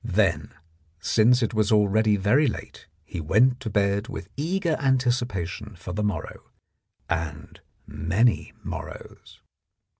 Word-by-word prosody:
Then, 100 -5 +1 0.5
since 120 +7 +3
it 115 - -1
was 110 -1 +1
already 105 0 +4
very 105 +10 +3
late, 115 - -6 0.2
he 85 +2 -5
went 125 - +3
to 120 - -5
bed 100 +1 +1
with - - -7
eager 170 +3 0
anticipation 120 - -1
for 85 +1 -7
the 105 - -2
morrow 100 -7 -3 0.7
and 80 -3 -4 0.3
many 95 +11 +1
morrows. - - -9
105 Hz, 120 wpm, -25 LUFS, 95-125 Hz, 0.7 s, already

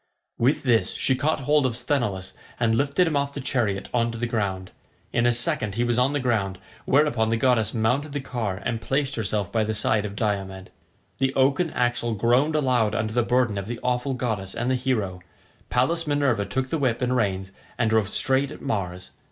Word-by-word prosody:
With 130 +6 +2
this 120 -4 +2
she 130 - +2
caught 145 +3 0
hold 145 +2 +3
of 125 -3 -1
Sthenelus 105 -10 -1 0.3
and 115 -1 +2
lifted 140 +9 +2
him 160 -3 -1
off 140 0 -1
the - - -3
chariot 110 -7 -1
on 120 -1 +2
to 115 - -6
the 120 - -1
ground. 100 -6 -2 0.4
In 120 +1 +3
a - - +5
second 110 -3 +1
he 120 - +1
was 120 0 +1
on 130 +2 +3
the 145 - 0
ground, 105 -7 0 0.3
whereupon 130 -6 +2
the 115 - +1
goddess 115 -3 +2
mounted 125 +7 0
the 145 - -2
car 115 -8 -3
and 115 -2 -2
placed 135 +3 0
herself 105 -4 -2
by 110 -1 +1
the 110 +1 -2
side 105 0 +1
of 100 -1 -5
Diomed. 95 -3 -3 0.5
The 135 0 +1
oaken 140 +6 +2
axle 120 -3 0
groaned 125 +8 +2
aloud 125 -7 +2
under 110 0 -1
the 120 - +3
burden 120 -3 +1
of 100 - -6
the 120 0 -5
awful 125 +2 0
goddess 110 -6 -3
and 120 +2 -1
the - - +2
hero; 110 -8 -1 0.5
Pallas 160 +7 +1
Minerva 140 -8 +1
took 130 0 -2
the 165 - 0
whip 125 -3 0
and 125 +1 +1
reins, 95 -5 -1 0.3
and 115 -3 +1
drove 110 -3 +2
straight 135 +1 +1
at 150 - -9
Mars. 90 -8 -3
120 Hz, 205 wpm, -24 LUFS, 110-130 Hz, 0.5 s, a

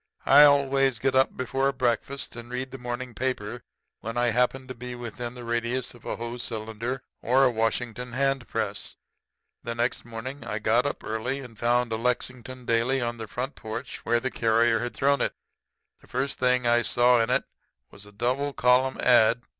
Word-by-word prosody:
"I 145 +2 +9
always 135 -3 +3
get 130 +4 0
up 130 0 +3
before 135 +2 0
breakfast 130 +1 -1
and 120 0 -9
read 130 +1 -4
the 135 - -8
morning 120 0 -5
paper 120 -2 -3 0.4
whenever 120 +2 -1
I - - +3
happen 125 +2 +1
to 130 - -6
be 125 0 -7
within 120 0 -6
the 125 - -8
radius 120 +2 -2
of 120 -1 -17
a - - -2
Hoe 120 +1 -5
cylinder 115 +2 -4 0.2
or 130 +3 +4
a 130 - +5
Washington 120 +2 -2
hand 135 -1 0
press. - - -3 0.7
The 115 0 -4
next 120 +1 -1
morning 125 +4 -7
I - - -3
got - - +2
up - - -5
early, 125 +5 -3
and 125 -4 -11
found 120 +1 +1
a - - 0
Lexington 125 +1 -3
daily 115 +4 +2
on 120 -1 -2
the 110 -1 -6
front 130 +6 -4
porch 110 0 -7
where 120 - +2
the 130 +2 -3
carrier 115 0 +3
had 120 +1 -4
thrown 140 -1 +2
it. - - -1 0.6
The - - -21
first 130 +2 -2
thing 125 -1 +2
I 120 0 +4
saw 120 +1 +4
in 115 - 0
it 125 - +2 0.5
was 105 +1 -11
a - - -14
double 125 +7 -1
column 125 +1 +3
ad. 120 -1 +5
125 Hz, 190 wpm, -26 LUFS, 115-130 Hz, 0.7 s, I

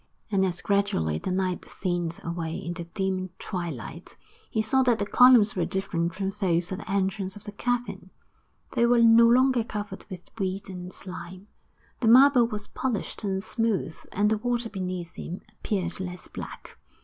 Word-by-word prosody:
And 195 -2 +3
as 180 -2 -1
gradually 85 - +1
the - - -3
night 185 -1 -1
thinned 175 -3 -3
away 170 -1 -3
into 170 0 -5
dim 185 +1 -2
twilight, 170 - -6 0.3
he 225 - -2
saw 220 +5 +3
that 245 -3 +3
the 205 - -1
columns 240 -1 +6
were 180 - +1
different 170 -2 -1
from 195 0 -2
those 180 -4 0
at 190 - -3
the - - -10
entrance 195 0 -1
of 205 - -11
the 205 - -7
cavern; 245 +3 -2 0.6
they 235 - +3
were 240 -1 +5
no 230 0 +7
longer 255 0 +4
covered 205 -3 -6
with 180 -2 -10
weed 195 0 -2
and 180 0 -7
slime, 185 +1 -9 0.5
the 230 - 0
marble 250 0 +7
was 210 -2 -5
polished 245 -4 -3
and 190 -1 -1
smooth; 220 -8 -1 0.2
and 210 +2 +2
the 220 - +1
water 240 0 -1
beneath 185 -4 -4
him 180 - -6 0.2
appeared 185 -5 -1
less 180 -1 -6
black. - - -9
195 Hz, 170 wpm, -27 LUFS, 180-225 Hz, 0.6 s, no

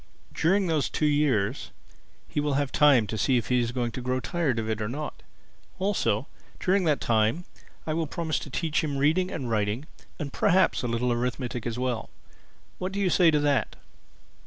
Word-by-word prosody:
During 190 +4 +2
those 160 -4 0
two 155 - -1
years 140 -6 +1 0.6
he - - -2
will 145 -1 0
have 140 -1 0
time 140 -7 +5
to 110 +1 -4
see 130 +5 +3
if 115 - -2
he 125 -1 +3
is 120 -1 0
going 120 -2 -2
to 130 - -6
grow 125 +1 -1
tired 155 -4 -1
of 110 -1 -2
it 110 0 -2
or 105 - -2
not. 150 +5 -5 0.6
Also 185 - 0 0.3
during 185 0 +2
that 150 -3 +2
time, 115 +9 +1 0.4
I 155 - -1
will 160 0 -1
promise 160 0 -2
to - - -8
teach 160 +4 -1
him 145 -3 -2
reading 160 +7 +2
and 135 -9 -4
writing 110 +4 -1 0.3
and 145 -5 -5
perhaps 185 0 +3
a 125 - -2
little 120 +1 0
arithmetic 125 0 -3
as 120 0 -3
well. 125 -3 -2 0.7
What 185 +1 -3
do 200 - -2
you 190 -3 +2
say 175 -3 +5
to 150 -2 +3
that?" 145 -2 +1
140 Hz, 195 wpm, -27 LUFS, 120-160 Hz, 0.7 s, time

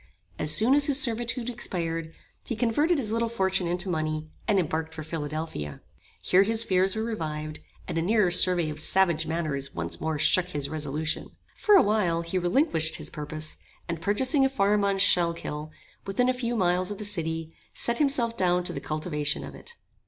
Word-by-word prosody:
As 150 - +3
soon 220 - +5
as 285 0 +4
his 285 -1 +2
servitude 235 0 0
expired, 165 -9 -4 0.3
he 235 - -4
converted 290 +10 +1
his 225 -6 -2
little 230 +1 0
fortune 190 -5 0
into 175 +3 -1
money, 155 -2 -2 0.2
and 210 -3 +3
embarked 160 -1 -2
for 160 - -6
Philadelphia. 150 - -5 0.4
Here 185 - +4
his 225 +3 +1
fears 190 -1 +1
were 220 - -2
revived, 155 -9 -4 0.3
and 165 - -2
a - - 0
nearer 200 0 +2
survey 175 -3 +5
of 150 - -7
savage 170 -2 +2
manners 150 -4 -2
once 85 0 -4
more 160 -1 -1
shook 165 +4 +3
his 145 -5 -3
resolution. 155 0 -3 0.3
For 420 - +4
a 380 - +7
while 185 -6 +1
he 170 +2 -2
relinquished 175 - +2
his - - -6
purpose, 155 0 -5 0.3
and 170 -2 -4
purchasing 260 - +2
a 270 - +3
farm 205 -4 +1
on 200 -1 +1
Schuylkill, 170 -5 +2 0.4
within 245 +6 +1
a - - +3
few 240 -1 -2
miles 180 -2 +1
of 205 - -5
the 210 - -5
city, 165 -4 -3 0.2
set 235 0 -1
himself 260 -6 +2
down 180 -2 +1
to - - -2
the - - -5
cultivation 155 -1 0
of - - -8
it. 475 - -10
180 Hz, 185 wpm, -26 LUFS, 155-225 Hz, 0.4 s, a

